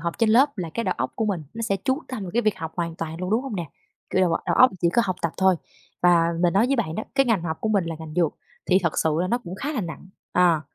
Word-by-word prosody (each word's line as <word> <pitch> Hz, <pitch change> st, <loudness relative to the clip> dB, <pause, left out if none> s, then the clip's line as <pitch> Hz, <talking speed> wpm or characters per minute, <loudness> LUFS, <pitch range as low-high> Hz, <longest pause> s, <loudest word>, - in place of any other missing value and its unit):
học 170 Hz, +1 st, -3 dB
trên 230 Hz, -2 st, +3 dB
lớp 265 Hz, +1 st, +4 dB
là 170 Hz, -3 st, -3 dB
cái 230 Hz, -, -1 dB
đầu -, -, 0 dB
óc -, -, -2 dB
của 220 Hz, -, -1 dB
mình 195 Hz, -6 st, -1 dB
nó 230 Hz, -, -5 dB
sẽ 200 Hz, -3 st, 0 dB
chú 265 Hz, +1 st, +1 dB
tâm 255 Hz, -5 st, -5 dB
vào 185 Hz, -, -5 dB
cái 240 Hz, -, +2 dB
việc 215 Hz, -1 st, +1 dB
học 160 Hz, 0 st, -5 dB
hoàn 170 Hz, -1 st, -2 dB
toàn 165 Hz, 0 st, -5 dB
luôn, 185 Hz, 0 st, -3 dB
đúng 225 Hz, +4 st, +2 dB
hông 265 Hz, -7 st, -5 dB
nè? 170 Hz, -4 st, -5 dB, 0.4 s
Kiểu, 185 Hz, -, +2 dB
đầu 185 Hz, -2 st, +3 dB, 0.2 s
đầu -, -, +2 dB
óc 255 Hz, -, +7 dB
chỉ 170 Hz, -, +3 dB
có 235 Hz, -, +4 dB
học 185 Hz, -2 st, -2 dB
tập 170 Hz, -, 0 dB
thôi 190 Hz, 0 st, +4 dB, 0.5 s
và 175 Hz, -1 st, +5 dB, 0.2 s
mình 175 Hz, -1 st, +3 dB
nói 205 Hz, +6 st, +4 dB
với 275 Hz, +1 st, +1 dB
bạn 175 Hz, -9 st, -1 dB
đó, 215 Hz, -, -3 dB
cái 270 Hz, -1 st, +3 dB
ngành 215 Hz, -7 st, +2 dB
học 160 Hz, -2 st, -3 dB
của 220 Hz, -, -1 dB
mình 200 Hz, -5 st, +2 dB
là 165 Hz, -, -4 dB
ngành 160 Hz, -1 st, -8 dB
dược, 170 Hz, -3 st, +2 dB, 0.3 s
thì 185 Hz, 0 st, +5 dB
thật 170 Hz, -, 0 dB
sự 160 Hz, -, +2 dB
là 180 Hz, -, +1 dB
nó 240 Hz, -, +1 dB
cũng 180 Hz, -7 st, -8 dB
khá 285 Hz, +10 st, -4 dB
là 260 Hz, -, -1 dB
nặng, 175 Hz, 0 st, -7 dB, 0.2 s
à. 175 Hz, -3 st, +4 dB
185 Hz, 315 wpm, -24 LUFS, 170-225 Hz, 0.5 s, óc